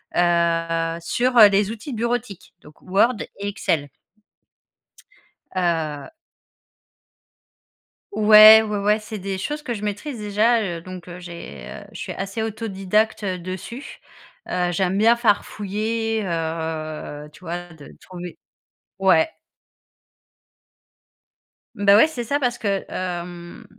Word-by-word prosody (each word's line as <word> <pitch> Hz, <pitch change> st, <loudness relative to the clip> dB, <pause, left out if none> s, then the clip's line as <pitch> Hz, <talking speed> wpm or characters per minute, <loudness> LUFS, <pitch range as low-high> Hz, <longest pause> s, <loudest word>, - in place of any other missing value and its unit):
heu, 165 Hz, -1 st, +1 dB
sur, 245 Hz, +8 st, 0 dB
heu, 215 Hz, -3 st, +11 dB
les 200 Hz, +1 st, +1 dB
outils 230 Hz, +4 st, -7 dB
bureautiques 235 Hz, -3 st, -3 dB
donc 150 Hz, 0 st, -18 dB
Word 205 Hz, +6 st, +2 dB, 0.2 s
et 200 Hz, +1 st, -4 dB
Excel 150 Hz, -7 st, -1 dB, 1.6 s
heu 165 Hz, -, -2 dB, 2.0 s
Ouais, 215 Hz, -, +9 dB
ouais, 210 Hz, -1 st, -3 dB
ouais. 210 Hz, +2 st, +2 dB
C'est 215 Hz, 0 st, -7 dB
des 195 Hz, 0 st, -4 dB
choses 295 Hz, +7 st, -4 dB
que 245 Hz, -5 st, -3 dB
je 210 Hz, -, -6 dB
maîtrise, 210 Hz, +6 st, -4 dB
déjà, 215 Hz, +3 st, +2 dB
heu, 175 Hz, -5 st, -4 dB
donc, 185 Hz, 0 st, -10 dB
heu, 175 Hz, 0 st, -9 dB
j'ai, 170 Hz, -, -9 dB
heu, -, -, -9 dB
je -, -, -9 dB
suis -, -, -5 dB
assez 195 Hz, +3 st, -4 dB
autodidacte, 215 Hz, 0 st, -1 dB
heu, 185 Hz, -2 st, -2 dB
dessus, 185 Hz, +9 st, -7 dB, 0.5 s
heu, 180 Hz, -1 st, 0 dB
j'aime 185 Hz, +2 st, 0 dB
bien 230 Hz, +2 st, +5 dB
farfouiller, 220 Hz, 0 st, -1 dB
heu, 160 Hz, -3 st, -4 dB
tu -, -, -16 dB
vois? 175 Hz, 0 st, -6 dB
De 150 Hz, -3 st, -14 dB
trouver 180 Hz, -1 st, -9 dB, 0.6 s
ouais. 190 Hz, -, +4 dB, 2.5 s
Beh, 200 Hz, 0 st, +5 dB
ouais, 215 Hz, -, +7 dB
c'est 260 Hz, -7 st, -5 dB
ça 280 Hz, +5 st, -1 dB
parce 245 Hz, -3 st, -1 dB
que 200 Hz, -2 st, -1 dB
hem, 175 Hz, -1 st, -6 dB
195 Hz, 125 wpm, -22 LUFS, 175-220 Hz, 2.5 s, heu